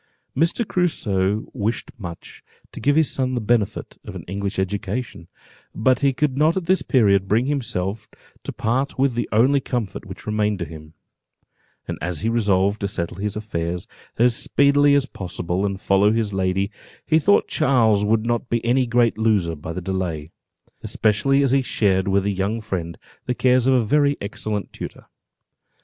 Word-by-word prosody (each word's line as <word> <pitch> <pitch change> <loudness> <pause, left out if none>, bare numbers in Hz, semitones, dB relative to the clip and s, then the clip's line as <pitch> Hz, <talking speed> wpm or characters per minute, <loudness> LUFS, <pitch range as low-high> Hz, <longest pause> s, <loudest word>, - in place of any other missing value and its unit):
Mr. 170 - +1
Crusoe 105 - 0
wished 115 -1 -2
much 85 -7 -9 0.3
to - - -9
give 145 +2 +2
his 160 -2 +3
son 130 -1 -1
the - - 0
benefit 110 -2 -1
of - - -9
an - - -7
English 100 +2 -4
education, 95 0 -3 0.5
but 125 +3 +2
he 140 -1 +3
could 135 0 0
not 160 +4 +3
at 185 - -2
this 185 +2 +2
period 100 - +3
bring 110 +5 +2
himself 110 -7 -2 0.3
to - - -4
part 130 +5 -1
with 135 -1 +2
the 120 - -2
only 130 +6 +4
comfort 120 -7 -4
which - - -10
remained 105 -1 0
to 90 - -3
him: 75 0 -11 0.9
and - - -5
as 85 -1 -3
he 110 - 0
resolved 100 -3 +1
to 100 - 0
settle 85 -3 -4
his 105 0 -2
affairs 90 -5 -3 0.3
as 120 0 +4
speedily 140 +2 +3
as 140 -2 +3
possible, 90 -4 -3
and 100 -1 -4
follow 100 +2 +3
his 110 -2 -1
lady, 95 +1 0 0.3
he 160 0 +3
thought 205 +6 +3
Charles 115 -9 +3
would 110 +1 +1
not 120 +1 -1
be 115 0 -1
any 125 +1 +2
great 120 -2 +2
loser 105 -7 +2
by 80 +1 -7
the 90 - -5
delay, 85 -4 -3 0.5
especially 135 +6 +2
as 135 - +2
he 135 0 +4
shared 95 -6 +1
with 100 0 +2
a 100 - +1
young 100 +4 -1
friend 90 -6 -4 0.3
the 125 - 0
cares 125 0 +3
of 135 - +4
a 125 - +3
very 145 +5 +2
excellent 105 0 -4
tutor. - - -8
110 Hz, 175 wpm, -22 LUFS, 95-130 Hz, 0.9 s, only